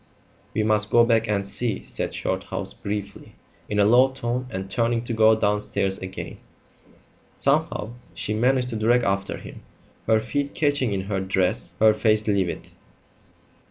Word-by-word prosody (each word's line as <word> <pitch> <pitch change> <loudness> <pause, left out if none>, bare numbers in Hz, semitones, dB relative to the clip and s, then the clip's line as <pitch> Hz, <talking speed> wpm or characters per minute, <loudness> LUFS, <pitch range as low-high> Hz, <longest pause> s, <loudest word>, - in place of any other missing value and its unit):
"We 110 - +1
must 105 0 +1
go 120 +2 +5
back 115 -1 +2
and 100 -2 -1
see," 110 0 -3
said - - -4
Shorthouse - - -3
briefly, 100 0 -6 0.3
in 105 - -1
a 100 - +5
low 125 +5 +6
tone, 125 -1 -3
and 95 -4 -5
turning 115 +3 0
to 120 - -4
go 110 0 +5
downstairs 105 -2 0
again. 95 0 -7 1.0
Somehow 145 -5 0 0.2
she 105 +4 -2
managed 125 +3 +2
to - - -3
drag 120 +3 +3
after 100 -1 -1
him, - - -11 0.5
her 110 -1 +4
feet 140 +5 -3
catching 145 -6 +1
in 95 -1 -1
her 95 0 -2
dress, 95 -2 -1
her 110 0 +6
face 110 0 +1
livid. 100 -4 -1
110 Hz, 155 wpm, -24 LUFS, 100-120 Hz, 1.0 s, low